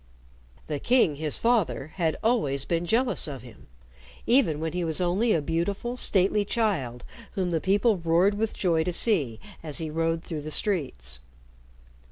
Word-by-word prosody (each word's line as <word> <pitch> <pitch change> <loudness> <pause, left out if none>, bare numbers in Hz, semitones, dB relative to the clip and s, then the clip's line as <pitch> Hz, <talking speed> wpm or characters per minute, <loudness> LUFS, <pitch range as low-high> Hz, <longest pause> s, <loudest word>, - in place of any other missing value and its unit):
The 150 -2 -3
king, 235 - +2
his 155 -1 -3
father, 220 - 0
had 165 -4 -1
always 145 - +1
been 170 0 -1
jealous 245 +2 +1
of 135 -5 -7
him, 120 -4 -15 0.6
even 220 - +3
when 160 0 -3
he 180 0 -2
was 160 0 0
only 185 +6 +1
a 160 -7 +1
beautiful, 195 - -2
stately 205 -3 +4
child 185 - -1 0.3
whom 185 -4 -1
the 165 -2 0
people 205 +2 +2
roared 170 +4 +2
with 215 +1 -2
joy 165 -4 +1
to 180 - -1
see 150 - +1 0.2
as 150 -3 -4
he 160 -2 -3
rode 165 +1 -1
through 160 -3 -5
the 155 - -6
streets. 130 - -2
170 Hz, 165 wpm, -26 LUFS, 155-205 Hz, 0.6 s, stately